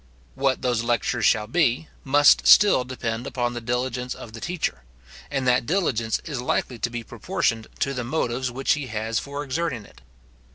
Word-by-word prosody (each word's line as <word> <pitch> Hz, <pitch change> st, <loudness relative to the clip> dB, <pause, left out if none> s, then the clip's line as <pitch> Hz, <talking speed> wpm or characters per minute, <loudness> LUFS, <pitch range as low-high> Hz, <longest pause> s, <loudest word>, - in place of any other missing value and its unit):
What 135 Hz, -1 st, 0 dB
those 120 Hz, -3 st, +1 dB
lectures 120 Hz, -1 st, +1 dB
shall 110 Hz, -2 st, +3 dB
be, 135 Hz, +3 st, +1 dB, 0.2 s
must 145 Hz, +2 st, +5 dB
still 205 Hz, -11 st, +7 dB
depend 120 Hz, -1 st, -4 dB
upon 120 Hz, -1 st, -2 dB
the 120 Hz, -, -5 dB
diligence 125 Hz, +1 st, -2 dB
of 110 Hz, -, -11 dB
the 115 Hz, -, -9 dB
teacher; 165 Hz, -, -3 dB, 0.5 s
and 135 Hz, -3 st, -1 dB
that 125 Hz, -2 st, +2 dB
diligence 130 Hz, -, 0 dB
is 140 Hz, -6 st, -4 dB
likely 125 Hz, -1 st, -1 dB
to 115 Hz, -, -1 dB
be 120 Hz, 0 st, -5 dB
proportioned 110 Hz, 0 st, -2 dB
to 135 Hz, -, +1 dB
the 125 Hz, -2 st, -3 dB
motives 125 Hz, -1 st, -1 dB
which 130 Hz, +2 st, -1 dB
he 150 Hz, -3 st, -4 dB
has 110 Hz, 0 st, -2 dB
for 140 Hz, +1 st, -5 dB
exerting 135 Hz, -5 st, -3 dB
it. -, -, -18 dB
125 Hz, 175 wpm, -24 LUFS, 115-140 Hz, 0.5 s, still